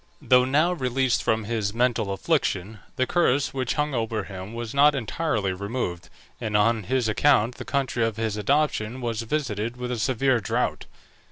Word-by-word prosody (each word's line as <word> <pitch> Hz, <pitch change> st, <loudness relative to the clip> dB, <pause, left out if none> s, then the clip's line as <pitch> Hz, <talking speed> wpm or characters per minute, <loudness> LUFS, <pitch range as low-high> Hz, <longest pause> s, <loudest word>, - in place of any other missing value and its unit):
Though 125 Hz, 0 st, +4 dB
now 155 Hz, +7 st, +2 dB
released 130 Hz, -4 st, 0 dB
from 110 Hz, 0 st, 0 dB
his 105 Hz, -1 st, -2 dB
mental 115 Hz, -4 st, +1 dB
affliction, 95 Hz, +2 st, -1 dB, 0.2 s
the 130 Hz, -2 st, +1 dB
curse 145 Hz, -3 st, +1 dB
which 130 Hz, -3 st, -1 dB
hung 150 Hz, -1 st, 0 dB
over 115 Hz, -2 st, -1 dB
him 95 Hz, +3 st, -8 dB
was 115 Hz, -1 st, -5 dB
not 145 Hz, +1 st, +5 dB
entirely 115 Hz, -, -1 dB
removed, 100 Hz, -2 st, -4 dB, 0.3 s
and 110 Hz, -3 st, 0 dB
on 110 Hz, 0 st, +2 dB
his 130 Hz, -1 st, 0 dB
account 120 Hz, 0 st, +3 dB
the -, -, -7 dB
country 135 Hz, -4 st, 0 dB
of 115 Hz, -1 st, -1 dB
his 110 Hz, -2 st, -1 dB
adoption 130 Hz, -1 st, 0 dB
was 115 Hz, -3 st, -2 dB
visited 115 Hz, -3 st, -2 dB
with 125 Hz, 0 st, -4 dB
a 120 Hz, -, -2 dB
severe 130 Hz, +1 st, +2 dB
drought. 100 Hz, -, -2 dB
120 Hz, 170 wpm, -25 LUFS, 110-130 Hz, 0.3 s, not